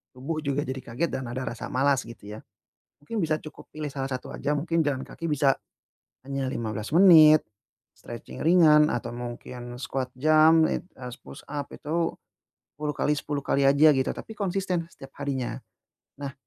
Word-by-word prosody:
tubuh 140 +5 -4
juga 140 0 0
jadi 130 +1 -3
kaget 125 +8 -2
dan 130 -1 -3
ada 130 - -4
rasa 120 - -6
malas, 135 0 +2
gitu 105 -2 -10
ya, - - -9 0.6
mungkin 220 +9 -3
bisa 155 -1 +1
cukup 155 - -12
pilih 155 0 -4
salah 135 -1 -3
satu 130 -1 -5
aja, 150 +1 -1
mungkin 165 +2 0
jalan 135 -2 -1
kaki 165 - -7
bisa 140 -2 +3 0.7
hanya 135 -1 -2
15 110 -3 -4
menit, 160 -4 +8 0.6
stretching 120 -1 -9
ringan, 155 -3 +6
atau 120 -1 -3
mungkin 120 0 -7
squat 130 -2 -3
jump, 155 +3 +5
it - - -2
eee, 125 -1 -7
s - - -11
push 135 - -11
up 145 -1 -5
itu 165 +2 -2 0.6
10 150 0 -2
kali 150 - +1
10 145 0 -3
kali 140 - +1
aja, 140 +3 +6
gitu, 130 - +1
tapi 220 - -9
konsisten 185 -3 -1
setiap 135 0 -13
harinya. 135 -3 -3 0.6
Nah, 140 -1 -4
140 Hz, 170 wpm, -26 LUFS, 130-155 Hz, 0.7 s, menit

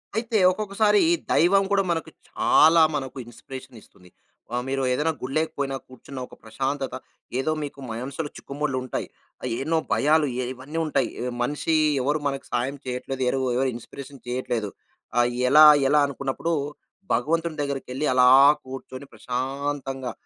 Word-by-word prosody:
అయితే, 230 0 0
ఒక్కొక్కసారి 210 +1 +2 0.3
దైవం 195 +4 +4
కూడా 195 -1 +3
మనకు 165 -1 -2 0.2
చాలా 160 +1 +5
మనకు 135 -1 -4
ఇన్‌స్పిరేషనిస్తుంది. 120 -6 -12 0.5
ఆ - - +1
మీరు 135 0 -1
ఏదైనా 150 +5 +1
గుళ్ళోకి 155 +5 -1
పోయినా 135 -1 -2
కూర్చున్న 130 +1 -10
ఒక - - -15
ప్రశాంతత 135 +4 -3 0.4
ఏదో 155 +4 0
మీకు 140 -1 -7
మనసులు 135 +6 -4
చిక్కుముడులుంటాయి. 135 -3 -3 0.3
ఆహ్, - - -3
ఎన్నో 160 +3 +1 0.2
భయాలు 150 0 +3
ఎ - - -1
ఇవన్నీ 135 +5 -8
ఉంటాయి. 155 - 0
ఎ - - -2 0.2
మనిషి 150 +4 -1 0.3
ఎవరు 145 +4 0
మనకు 135 -1 -4
సాయం 130 +4 -1
చెయ్యట్లేదు. 130 +1 -4
ఎరవు 130 0 0
ఎవరు 130 0 +1
ఇన్‌స్పిరేషన్ 135 +3 -10
చెయ్యట్లేదు. 120 -4 -2 0.5
ఆహ్, 120 0 +3 0.2
ఎలా, 155 +2 +9 0.2
ఎలా? 150 0 +5
అనుకున్నప్పుడు 140 +4 -3 0.6
భగవంతుని 160 +5 0
దగ్గరికెళ్ళి 140 0 -3
అలా 125 0 +6 0.3
కూర్చొని, 130 +1 -9
ప్రశాంతంగా 135 0 -3
135 Hz, 135 wpm, -24 LUFS, 130-155 Hz, 0.6 s, ఎలా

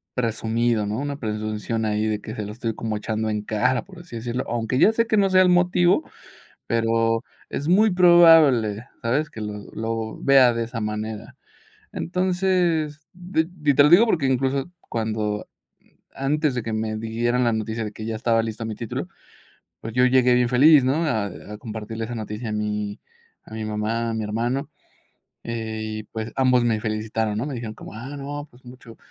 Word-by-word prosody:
presumido, 115 -1 0
¿no?, 105 - -2
una 145 0 -3
presunción 110 -1 -3
ahí 105 0 0
de 105 -1 -1
que 110 - -7
se 105 - -4
lo 105 - -6
estoy 115 -1 -3
como 110 -1 -3
echando 110 +1 -2
en 105 -1 -1
cara, 120 +4 0
por 185 -2 -13
así 170 -8 -11
decirlo. 120 +2 -3
Aunque, 120 +2 -1
ya 220 - +5
sé 230 0 +1
que 220 - +2
no 195 -1 +4
sea 185 0 +5
el 180 - +4
motivo, 180 - +3 0.6
pero, 115 0 +1 0.3
es 145 - -4
muy 205 +5 +4
probable, 165 - +6 0.2
¿sabes?, 140 +7 0
que 110 - -8
lo 105 -1 -6
lo 110 0 -3
vea 135 -3 +6
de 115 0 -1
esa 115 -1 -5
manera. 105 0 -5 0.6
Entonces, 180 -4 0
de 175 -2 -1
de 155 -5 0
y - - +1
te 145 - +7
lo 150 - +5
digo 185 +8 +7
porque 165 -10 +1
incluso, 135 +2 0 0.2
cuando 110 -2 -2 0.7
antes 150 +1 0
de 120 - -2
que 110 0 -4
me 110 0 -2
dieran 120 +3 0
la 120 - +2
noticia 110 +1 -3
de 105 - -5
que 110 - -7
ya 115 - -3
estaba 115 0 +1
listo 115 0 -5
mi 110 -1 -4
título, 115 +1 -5 0.7
pues, 115 0 -7
yo 125 0 +4
llegué 125 -1 +4
bien 125 -1 +3
feliz, 140 +2 +6
¿no?, 145 +6 +1
a 110 -8 0 0.3
a 105 - -6
compartirle 110 0 -6
esa 120 - -6
noticia 110 +1 -5
a - - -3
mi 105 -1 -3 0.4
a 110 - -11
mi 110 - -4
mamá, 110 +2 -2
a - - -2
mi 110 - -2
hermano. 120 +6 -2 0.8
Eh, 110 -1 -4
y, 110 0 -5
pues, 110 +1 -6
ambos 130 -2 +4
me 115 -2 +1
felicitaron, 110 0 -2
¿no?, 115 - -1
me 145 - -4
dijeron 115 -2 -6
como: - - -11
"Ah, 130 +6 -7
no, 145 +1 -6
pues, 125 +2 -21
mucho 125 -2 -13
115 Hz, 195 wpm, -23 LUFS, 110-140 Hz, 0.8 s, te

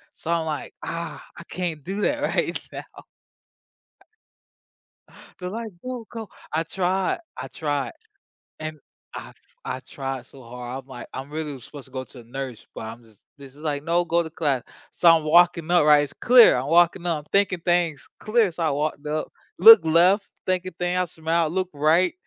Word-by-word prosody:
so 165 - -5
I'm 165 -1 +1
like, 150 -2 -4
"Ah, 170 0 -5
I - - -9
can't 170 -4 -4
do 195 +5 -4
that 290 +7 0
right - - 0
now." - - -10 2.4
They're 180 -1 -4
like, 225 +2 -5
"Go, 250 -3 -5
go." 225 -3 -7 0.2
I 160 +2 0
tried 185 - -1 0.2
I - - -5
tried, 145 0 -3 0.7
and 155 -1 -6 0.3
I - - -8 0.3
I 130 0 -3
tried 135 -1 -6
so 135 -2 -15
hard, 125 +2 -7
I'm - - -31
like, 125 -3 -9
"I'm 135 +2 -6
really 155 -1 -4
was 130 -4 -11
supposed 145 -3 -11
to 130 - -17
go 130 0 -4
to 130 - -14
a - - -17
nurse," 130 0 -7
but - - -6
I'm 115 +2 -10
just 110 -3 -23 0.2
this 140 -1 -13
is 150 - -15
like, 145 -2 -2
"No, 170 +2 +1
go 170 0 +1
to 160 - -7
class." 145 -6 -1 0.3
So 170 - +5
I'm 165 -1 +5
walking 170 +1 +4
up, 175 -4 +5
right, 150 -1 +6
it's 145 0 -7
clear 245 -1 +7
I'm 125 +2 -2
walking 175 +2 +3
up, 165 -3 0
I'm 150 - -14
thinking 195 -3 +2
things 175 -4 0
clear, 215 -3 +2
so 165 0 -4
I 160 - +2
walked 150 +1 -2
up, 155 +1 -3 0.3
look 220 -1 +10
left, 180 +6 +4 0.2
thinking 185 -1 -1
thing 180 0 0
I 180 - +2
smile, 160 0 -1
look 185 +2 -1
right, 155 +5 +3
160 Hz, 190 wpm, -24 LUFS, 140-180 Hz, 2.4 s, look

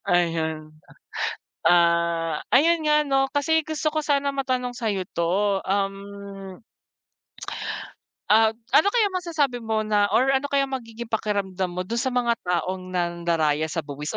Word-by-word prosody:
Ayun, 160 -3 0 0.9
ah, 170 -2 +3 0.2
ayun 330 +5 +5
nga 300 0 +4
ano, 270 -1 +2
kasi 320 +3 +3
gusto 310 0 -1
ko 310 - 0
sana 280 -2 +1
matanong 255 -2 -1
sa'yo 215 -6 -2
'to, 190 +4 +1
um 195 0 -4 1.7
Ah, 220 +1 +6 0.2
ano 355 +7 +6
kayang 420 -5 +2
masasabi 300 -9 -1
mo 220 -1 -1
na 205 -1 +2
or 270 +2 +3
ano 280 +2 0
kaya 275 -1 +2
magiging 235 -3 -6
pakiramdam 200 -4 -2
mo 180 +1 -4
dun 230 - -3
sa 260 - 0
mga 240 -1 +1
taong 185 +1 -2
nandaraya 170 -3 0
sa 160 -2 -3
buwis 150 +1 -5
205 Hz, 135 wpm, -24 LUFS, 175-270 Hz, 1.7 s, Ah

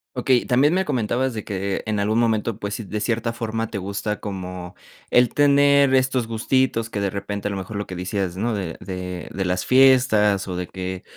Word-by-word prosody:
Okey, 125 0 +2
también 140 +7 +3
me 190 +1 +1
comentabas 130 - 0
de 110 - -5
que 100 -1 -3
en 105 -1 0
algún 110 +3 +1
momento, 115 -1 0
pues 100 0 -4
sí, 115 - -6
de 105 +2 -4
cierta 115 +1 -1
forma 115 -1 -3
te 100 - -3
gusta 100 +2 -3
como 90 -3 -6 0.3
el 125 -1 +4
tener 140 -1 +4
estos 130 -2 +1
gustitos, 115 0 0
que 100 - -3
de 100 - 0
repente 100 +1 -4
a - - -2
lo 100 - -3
mejor 95 +2 -6
lo 100 - -4
que 95 - -7
decías, 90 0 -3
¿no? 115 +3 -1
De 95 -6 -4
de 90 -2 -6
de 95 -1 -2
las 90 0 -1
fiestas, 125 -7 +4
o, 90 - -4
de 90 0 -4
que, 95 0 -6
105 Hz, 210 wpm, -22 LUFS, 95-125 Hz, 0.3 s, el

